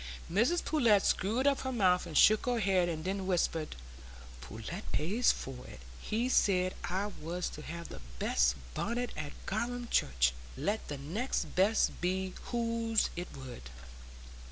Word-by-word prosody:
Mrs 240 - +2
Pullet 230 -10 +4
screwed 225 +8 +1
up 280 -1 +4
her 260 - -3
mouth 185 -7 +3
and 155 - -2
shook 215 +3 +6
her 245 -1 +2
head, 185 -4 +2
and 155 -1 -4
then 190 0 -2
whispered, 165 -4 0 0.7
"Pullet 115 - -7
pays 205 +11 +2
for 130 -1 -7
it; - - -11 0.2
he 230 +3 -1
said 185 -7 +3
I 195 +4 -2
was 175 +3 -3
to 150 - -9
have 170 +2 -7
the - - -9 0.2
best 65 0 +2 0.2
bonnet 240 - -2
at 150 -1 -5
Garum 240 +3 -2
Church, 60 -1 +3 0.2
let 210 +2 -1
the 145 - -4
next 180 - -2
best 200 +4 +2
be 185 +1 -1
whose 230 -2 0
it 175 +1 -4
would." 125 - -9
190 Hz, 155 wpm, -32 LUFS, 160-230 Hz, 0.7 s, shook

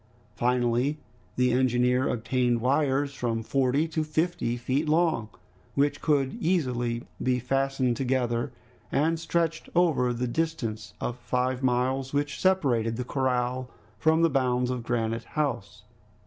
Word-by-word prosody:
Finally, 125 +4 +1 0.4
the 125 0 +2
engineer 125 0 +2
obtained 120 +1 +1
wires 140 +2 +1
from 115 -3 -2
forty 135 +5 +1
to 160 -1 -1
fifty 155 -5 -1
feet 135 +5 -1
long, 160 -9 +2 0.5
which 145 +1 +1
could 140 -4 +2
be 160 - 0
easily 120 -9 0 0.4
fastened 135 -1 0
together 125 -2 0 0.4
and 160 +3 +1
stretched 165 0 -1
over 160 -8 +3
the 120 +1 -2
distance 120 -7 -3
of 120 - -3
five 125 +1 -1
miles, 130 +1 0
which 145 +1 -1
separated 130 -12 +2
the 125 - -3
corral 130 -1 -1 0.3
from 160 +4 +3
the 165 - +5
bounds 125 -2 +1
of 125 -1 -2
Granite 115 -1 -2
House. 140 -11 -2
130 Hz, 130 wpm, -27 LUFS, 120-145 Hz, 0.5 s, the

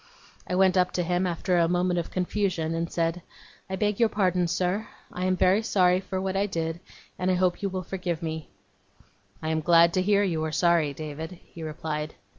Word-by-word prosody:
I 180 - -1
went 190 0 +4
up 180 0 +3
to 180 - 0
him, 180 +2 0
after 175 +1 0
a 165 - +4
moment 180 0 +1
of 170 - -4
confusion, 180 -3 -1
and 165 0 -2
said: 165 +1 -1 0.5
'I 190 - -2
beg 210 +1 0
your 230 -2 +4
pardon, 185 -4 +1
sir. 180 +5 -1 0.2
I 180 - -3
am 185 0 +1
very 190 +4 +4
sorry 185 -4 +3
for 190 0 -4
what 190 0 -2
I 200 +1 +1
did, 165 -3 -3 0.4
and 185 0 0
I 185 - +3
hope 180 -1 +1
you 200 - 0
will 185 -1 -4
forgive 180 -2 -4
me.' 160 -1 -4 0.9
'I 155 - -1
am 160 0 0
glad 170 +1 +5
to 185 - +2
hear 205 +1 +3
you 165 -5 0
are 160 - -2
sorry, 170 -3 +3
David,' 155 +3 -6 0.2
he 170 - -9
replied. 155 -1 -4
180 Hz, 210 wpm, -26 LUFS, 165-185 Hz, 0.9 s, glad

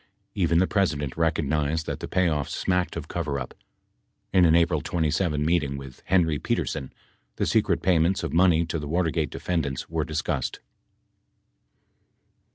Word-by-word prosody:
Even 85 -3 +2
the 90 - +4
President 80 -10 0
recognized 75 -1 0
that - - -4
the - - -5
payoffs 85 -6 0
smacked 90 -1 0
of - - -5
coverup. 70 -3 -3 0.8
In 90 -2 +6
an 80 -1 +5
April 85 -2 +3
27 80 -1 0
meet 85 +1 +3
ing 70 -1 -4
with 70 -2 -10
Henry 80 -5 +2
Petersen, 65 - -2 0.4
the - - 0
secret - - +1
payments 90 0 +2
of - - -3
money 85 -1 +4
to 80 0 -3
the 75 - -6
Water 85 +1 +1
gate - - -1
defendants 75 -6 -3
were 80 -1 0
discussed: 80 0 -2 1.8
HP. - - -45
80 Hz, 155 wpm, -25 LUFS, 75-85 Hz, 1.8 s, In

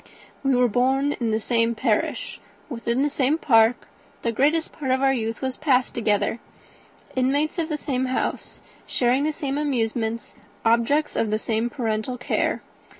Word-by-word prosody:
"We 270 -1 +2
were 250 0 +4
born 265 +5 +2
in 235 -2 0
the 220 0 +1
same 230 +1 +1
parish, 220 -2 -1 0.3
within 235 0 -1
the - - +3
same 280 +2 +1
park; 230 -5 +3 0.4
the 235 - +1
greatest 300 +7 +1
part 285 -4 -5
of 260 +1 +2
our 270 0 +4
youth 225 0 -3
was 260 -1 -2
passed 260 -5 +2
together: 225 0 0 0.8
inmates 285 +6 +1
of 325 -1 -1
the 305 - -1
same 260 -3 -1
house, 255 0 -3 0.3
sharing 255 +3 +2
the 310 - +1
same 285 -1 -3
amusements, 230 -5 -1 0.3
objects 235 +7 +2
of 220 - +1
the 215 - +1
same 225 +1 -1
parental 230 -1 -2
care. 250 - -1
250 Hz, 160 wpm, -24 LUFS, 230-275 Hz, 0.8 s, were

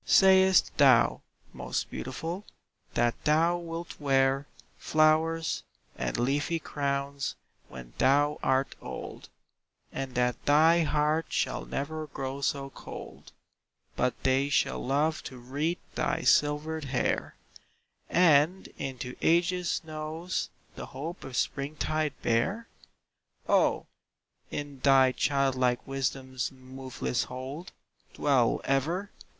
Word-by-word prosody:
Sayest 190 -1 +5
thou, - - +5 0.3
most - - -3
beautiful, 165 +9 -5 0.5
that 120 0 +1
thou 165 +3 +3
wilt 165 -1 -7
wear 135 0 +2 0.3
Flowers 160 +1 +2 0.3
and - - -2
leafy 145 +7 0
crowns 140 -3 -2 0.3
when 65 -2 -10
thou 145 +2 +3
art 130 +1 +1
old, - - -8 0.6
And 135 -1 -5
that 125 -1 0
thy 160 +4 +6
heart 155 +1 +1
shall - - -1
never 155 - -4
grow 135 -1 -5
so 135 0 -1
cold - - -10 0.6
But 125 0 +1
they 135 +2 +2
shall 145 - +1
love 150 +4 +1
to 130 - -7
wreath 145 +8 -2 0.2
thy - - -1
silvered 150 +1 +2
hair 130 -1 -1 0.7
And 170 +1 +4
into 130 -2 -5
age's 175 +1 +2
snows 160 +2 -3 0.3
the - - -7
hope 160 +7 -7
of 130 -3 -6
spring 140 +3 -1
tide 155 -1 -1
bear? 190 - 0 0.8
O, - - +3 0.6
in 145 -2 -6
thy 135 -1 +5
child 140 0 +1
like 125 -1 0
wisdom's 130 -1 -2
moveless 130 -1 -4
hold 135 +7 -7 0.4
Dwell 135 -5 +2
ever! 165 +9 0
140 Hz, 110 wpm, -29 LUFS, 130-160 Hz, 0.8 s, thy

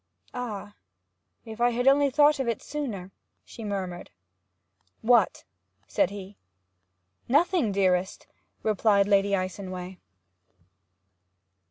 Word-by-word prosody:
'Ah! 210 -5 -5 0.7
if 220 +1 -8
I 240 - +5
had 245 +2 -1
only 280 +1 +5
thought 295 +2 +4
of 265 - -1
it 230 -3 -1
sooner!' 225 -11 -5 0.3
she 230 - -10
murmured. 190 -4 -4 0.9
'What?' 235 -3 +3 0.4
said - - +1
he. 200 0 -9 0.9
'Nothing, 295 - +2
dearest,' 190 -1 0 0.4
replied 210 -1 +3
Lady 200 0 +3
Icenway. 185 -1 -5
205 Hz, 95 wpm, -27 LUFS, 190-245 Hz, 0.9 s, I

